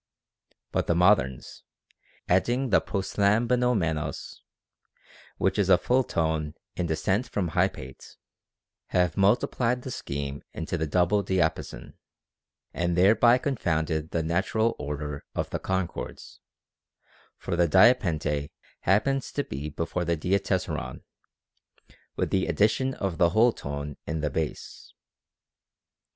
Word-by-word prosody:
But - - -1
the 85 - +2
moderns, 85 -9 +2 0.7
adding 120 +8 +1
the - - +5
proslam 100 +3 +1
banomenos, 90 - -1 1.0
which - - 0
is 100 -2 +2
a 90 - +7
full 125 +7 +2
tone 80 -6 -1 0.2
in 90 - -2
descent 95 +9 0
from 90 -4 -1
hypate, 65 -3 -2 0.7
have 90 -3 +1
multiplied 120 +4 +1
the 130 - -6
scheme 70 - -5
into 80 +2 -4
the 80 -2 -1
double 90 +6 +2
diapason, 85 -9 -2 0.7
and 85 0 -1
thereby 110 +6 +5
confounded 80 - -1
the 85 - -1
natural 100 +7 0
order 75 0 -5
of - - -2
the - - -2
concords; 95 -2 -4 1.0
for - - -3
the 85 0 +3
diapente 80 - +3 0.3
happens 130 +9 +1
to 145 - -1
be 75 - -6
before 85 +3 -3
the 85 -1 0
diatessaron, 90 -3 -2 1.1
with - - -2
the 95 - +1
addition 130 +5 +1
of 95 -5 -3
the 85 - +5
whole 110 +6 +4
tone 70 0 -6
in 80 0 -2
the 75 -1 -1
bass. 80 +2 -5
90 Hz, 120 wpm, -27 LUFS, 80-105 Hz, 1.1 s, a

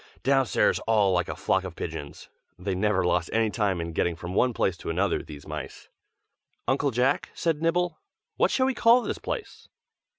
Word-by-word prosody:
downstairs 135 -2 +3
all 105 -4 +3
like 90 -1 0
a - - -3
flock 95 - +1
of 90 -3 -7
pigeons. 80 -4 -6 0.3
They 95 +2 -3
never 95 -1 +1
lost 90 -1 +1
any 110 -1 +2
time 100 -5 0
in 85 0 -4
getting 85 +1 0
from 85 +2 -7
one 125 +6 +3
place 95 -5 0
to - - -7
another, 90 +3 +1
these 75 -2 -11
mice. 75 -2 -7 0.8
"Uncle 140 +3 +2
Jack," 130 +3 +1
said 160 -3 0
Nibble, 175 +1 0 0.4
"What - - +3
shall 260 - +2
we 265 - +1
call 235 +1 +5
this - - -3
place?" 450 - -6
100 Hz, 185 wpm, -26 LUFS, 90-135 Hz, 0.8 s, call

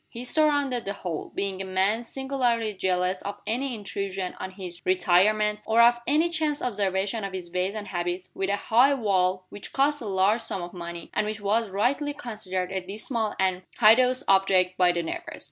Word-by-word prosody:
He 235 - -7
surrounded 285 -3 +2
the 200 - -2
whole 175 -5 -5
being 195 -1 -2
a - - -3
man 190 +4 +1
singularly 240 -4 -1
jealous 185 -1 0
of 200 0 -6
any 245 +4 -1
intrusion 195 -2 -4
on 190 - -4
his 185 -2 -9
retirement, 210 +4 +3
or 225 +1 +1
of 240 0 +5
any 315 +5 +2
chance 310 -3 0
observation 200 -1 -1
of 195 -1 -4
his 180 -2 -5
ways 185 +3 -1
and 210 -1 -6
habits 175 0 -3
with 195 0 -2
a 200 - +2
high 245 +7 +3
wall, 185 -5 +1
which 205 - -9
cost 290 +1 +2
a - - -6
large 195 +4 +2
sum 190 -5 -4
of 175 - -8
money, 170 -1 -7
and 210 - 0
which 215 0 -4
was 210 +2 0
rightly 265 +9 0
considered 210 -9 -4
a 190 -1 -2
dismal 215 +4 -2
and 185 -1 +1 0.2
hideous 250 +4 +5
object 190 -1 +3
by 180 -1 +4
the 170 -1 -2
neighbors. 160 - -6
200 Hz, 190 wpm, -26 LUFS, 185-235 Hz, 0.2 s, of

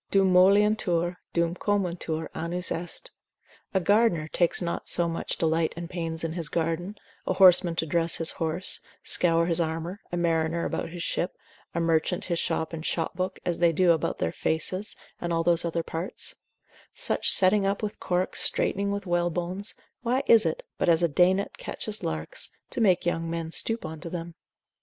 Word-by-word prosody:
Dum 195 -2 +3
moliuntur, 185 -2 +3
dum 170 0 +1
comuntur 175 -5 -2
annus 175 +2 -4
est: 175 - -5 0.6
a 190 - +2
gardener 200 -4 +2
takes 175 0 +1
not 170 -1 -3
so 170 - +3
much 165 0 -3
delight 160 0 +1
and 170 0 -6
pains 165 -2 -4
in 165 -1 -2
his 165 -3 -3
garden, 170 +4 -2 0.3
a - - +2
horseman 180 -2 +6
to 165 - 0
dress 165 +1 +1
his 165 - +2
horse, 165 +3 -1 0.2
scour 170 -1 +2
his 170 0 +1
armour, 165 +4 -3
a 175 - -2
mariner 165 -1 0
about - - -3
his 170 0 -6
ship, 175 - -2 0.4
a - - +1
merchant 165 +1 +1
his 170 -2 -1
shop 165 0 -1
and 160 -1 -5
shop 165 0 -2
book, 185 +1 -3
as 175 -2 -1
they 170 -1 +4
do 175 +2 +4
about 160 - 0
their 80 - -1
faces, 185 - -2 0.2
and 175 - -3
all 165 0 +1
those 170 0 +3
other 170 0 -1
parts: 165 +4 -3 0.6
such - - +1
setting 195 +1 +4
up 200 +2 -1
with 210 - -4
corks, 180 +1 0
straightening 200 +1 +2
with 200 0 -3
whalebones; 175 +3 -1 0.3
why 250 +2 0
is 225 -7 +6
it, 160 - -3 0.2
but - - +2
as 170 0 +4
a - - +5
day 175 +4 +4
net 195 +1 -3
catcheth 215 -1 -4
larks, 80 0 -4 0.2
to - - -2
make 185 -6 +3
young 165 -1 -1
men 165 -1 -4
stoop 225 +3 0
unto 160 +2 -7
them? 170 0 -6
170 Hz, 180 wpm, -27 LUFS, 165-185 Hz, 0.6 s, horseman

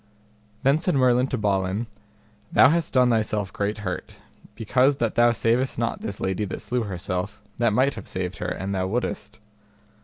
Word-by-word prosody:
Then 140 +3 +4
said 175 -1 0
Merlin 125 -1 +3
to 130 - -2
Balin, 100 0 0 0.7
Thou 130 - +7
hast 165 0 0
done 125 -2 +4
thyself 105 -3 0
great 105 +2 -2
hurt, 90 -2 -5 0.4
because 125 +5 +2
that 115 -4 -1
thou 120 0 +5
savest 120 +3 +1
not 115 0 -2
this 100 -1 -5
lady 95 +2 -1
that 95 - -5
slew 125 0 -1
herself, 90 +1 -4 0.2
that 120 -2 +3
might 130 +6 +2
have - - -9
saved 90 -1 -4
her - - -3
an 95 +2 -4
thou 95 -1 -1
wouldest. 110 -1 -3
110 Hz, 175 wpm, -24 LUFS, 100-125 Hz, 0.7 s, Thou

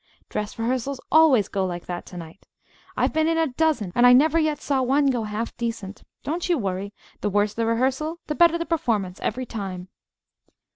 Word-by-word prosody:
Dress 210 0 -4
rehearsals 255 +3 -2
always 285 -10 +5
go 195 - -2
like 175 -2 -4
that 175 -1 -6
to 180 - -10
night. 165 +2 -11 0.5
I've - - +1
been 315 0 +2
in 330 0 +1
a 325 - +3
dozen, 275 - 0
and 240 +3 +5
I 245 - +8
never 310 +5 +5
yet 310 -2 0
saw 275 -3 0
one 275 +2 +3
go 235 -4 -2
half 215 +2 -4
decent. 230 -4 -5 0.2
Don't 335 +4 -3
you 345 - +3
worry. 195 -3 -3 0.3
The 210 - -1
worse 205 +1 +1
the 230 +1 -1
rehearsal, 265 +8 0
the 300 - -2
better 340 +1 +4
the 335 - -3
performance, 220 - -1
every 255 +4 -2
time!" 190 -5 -6
245 Hz, 195 wpm, -24 LUFS, 205-305 Hz, 0.5 s, I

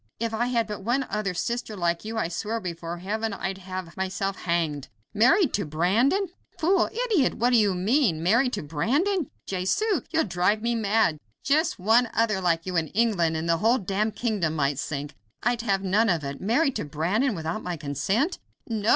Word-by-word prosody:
If 230 0 -2
I 235 +2 0
had 235 -2 +1
but 210 -1 -6
one 250 +5 +1
other 205 -3 -1
sister 235 +2 -3
like 170 -1 0
you, 220 +1 -5
I 220 - 0
swear 215 +6 -3
before 170 -3 -5
heaven 215 +4 -2
I'd 190 -1 -4
have 185 -2 -7
myself 190 +1 -2
hanged. 165 -6 -1 0.3
Married 260 - +4
to 200 - 0
Brandon? 200 - +2 0.3
Fool! 365 +5 +2 0.2
idiot! 385 - +2
what 245 +2 +2
do 245 - +5
you 205 -4 +3
mean? 190 - +2
Married 235 +8 +3
to 205 - -2
Brandon! 280 - 0 0.2
Jesu! 285 - 0
You'll 320 0 +2
drive 190 +3 +1
me 235 0 +1
mad! 215 -7 +2 0.2
Just 310 +4 +2
one 225 +5 +3
other 215 -4 +2
like 165 -2 +1
you 185 -1 -4
in 160 -1 +1
England, 185 -6 +1
and 160 +1 -3
the 165 0 +3
whole 225 +7 +3
damned 205 +1 -1
kingdom 200 -10 -1
might 140 -2 0
sink; 145 +1 -4 0.3
I'd 240 0 +1
have 195 -4 0
none 205 +4 +2
of 170 -5 +1
it. 140 0 -5
Married 250 - +2
to - - -3
Brandon 185 - 0
without 165 +5 -3
my 175 -1 -4
consent!" 155 - -1 0.3
"No! 220 -2 -1
205 Hz, 190 wpm, -26 LUFS, 170-235 Hz, 0.3 s, do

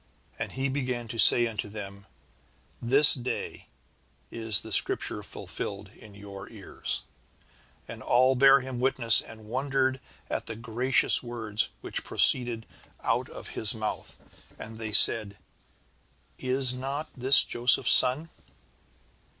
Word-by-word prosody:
And - - -6
he 135 +1 -3
began 125 -3 -5
to 115 0 -7
say 120 - +5
unto 110 -2 -6
them: 100 -1 -9 0.7
'This 135 +5 +5
day 125 -1 -7 0.6
is 110 -4 -2
this - - -3
Scripture - - -1
fulfilled - - -8
in 105 -2 -18
your 100 -1 -12
ears.' 105 -4 -6 0.8
"And - - -10
all 130 +2 +2
bare 135 +1 +4
him 130 -1 -8
witness, 125 -3 +3
and 110 -1 -15
wondered 130 +2 -2 0.3
at - - -6
the 115 - -7
gracious 120 +3 +2
words 115 -4 -3
which - - -7
proceeded 120 -3 +4 0.4
out - - -2
of - - -11
his 110 0 -1
mouth. 110 -1 -7 0.4
And 110 0 -11
they 110 -1 -7
said: 100 -1 +3 1.0
'Is 130 0 +2
not 135 +4 -6
this 130 +2 +5
Joseph's 120 +1 +1
son?'" 145 +6 +2
120 Hz, 125 wpm, -26 LUFS, 110-130 Hz, 1.0 s, say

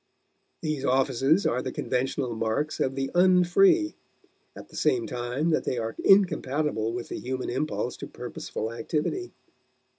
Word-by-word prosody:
These 155 -3 -2
offices 135 +5 +2
are 125 - +1
the 130 - -4
conventional 130 0 -1
marks 115 +7 -1
of 135 0 0
the 135 0 -2
un 180 0 +5
free, 330 - +4 0.6
at - - -10
the - - -14
same 370 -3 +1
time 125 +7 -2
that - - +1
they 125 - -2
are 115 -1 -3
incompatible 150 - +3
with 120 0 -5
the - - -4
human 130 0 -3
impulse 145 +5 -2
to - - -7
purposeful 110 +2 -6
activity. 155 - -2
135 Hz, 150 wpm, -27 LUFS, 125-175 Hz, 0.6 s, un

